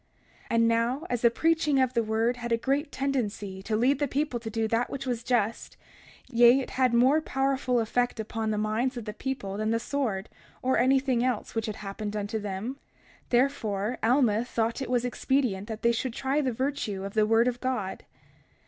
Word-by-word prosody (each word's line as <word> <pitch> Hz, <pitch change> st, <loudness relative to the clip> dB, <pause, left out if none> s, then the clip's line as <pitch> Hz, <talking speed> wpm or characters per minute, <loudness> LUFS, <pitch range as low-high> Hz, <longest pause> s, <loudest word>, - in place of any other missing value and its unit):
31:5 -, -, -21 dB
And 230 Hz, 0 st, +3 dB
now, 230 Hz, +5 st, +1 dB
as 245 Hz, -2 st, 0 dB
the 235 Hz, -, +6 dB
preaching 305 Hz, +2 st, +2 dB
of 260 Hz, -1 st, +2 dB
the 235 Hz, -, +2 dB
word 225 Hz, +2 st, 0 dB
had 240 Hz, -1 st, -5 dB
a 230 Hz, -, +4 dB
great 280 Hz, +5 st, -1 dB
tendency 210 Hz, -8 st, -2 dB
to 215 Hz, +2 st, -2 dB
lead 255 Hz, +5 st, +2 dB
the 290 Hz, -, +1 dB
people 275 Hz, -2 st, -1 dB
to 225 Hz, -1 st, -6 dB
do 225 Hz, 0 st, -1 dB
that 230 Hz, +2 st, 0 dB
which 275 Hz, -1 st, -5 dB
was 245 Hz, -3 st, -2 dB
just—yea, 240 Hz, +1 st, +1 dB
it 265 Hz, -, -5 dB
had 255 Hz, -1 st, +2 dB
had -, -, -5 dB
more 265 Hz, +6 st, +5 dB
powerful 270 Hz, -3 st, 0 dB
effect 245 Hz, +1 st, 0 dB
upon 220 Hz, 0 st, -3 dB
the 215 Hz, -, 0 dB
minds 220 Hz, +5 st, 0 dB
of 235 Hz, -, -5 dB
the 210 Hz, -, -5 dB
people 210 Hz, -6 st, -4 dB
than 215 Hz, +1 st, -1 dB
the 230 Hz, 0 st, +1 dB
sword, 230 Hz, -7 st, -2 dB, 0.4 s
or 260 Hz, +1 st, +2 dB
anything 260 Hz, -2 st, +3 dB
else, 250 Hz, -4 st, -1 dB
which 225 Hz, -1 st, -2 dB
had 215 Hz, -, -3 dB
happened 205 Hz, +1 st, -5 dB
unto 210 Hz, +1 st, -2 dB
them—therefore 220 Hz, +1 st, -2 dB
Alma 235 Hz, -2 st, +3 dB
thought 230 Hz, 0 st, -1 dB
it 265 Hz, -, -4 dB
was 245 Hz, -1 st, +1 dB
expedient 245 Hz, -5 st, 0 dB
that 220 Hz, -1 st, -6 dB
they 235 Hz, -, +5 dB
should 235 Hz, +1 st, -2 dB
try 275 Hz, +4 st, 0 dB
the 265 Hz, -3 st, 0 dB
virtue 240 Hz, -6 st, -2 dB
of 200 Hz, 0 st, -6 dB
the 215 Hz, -1 st, +3 dB
word 225 Hz, +2 st, +4 dB
of 245 Hz, 0 st, -2 dB
God. 250 Hz, -7 st, -2 dB
235 Hz, 200 wpm, -28 LUFS, 220-260 Hz, 0.4 s, the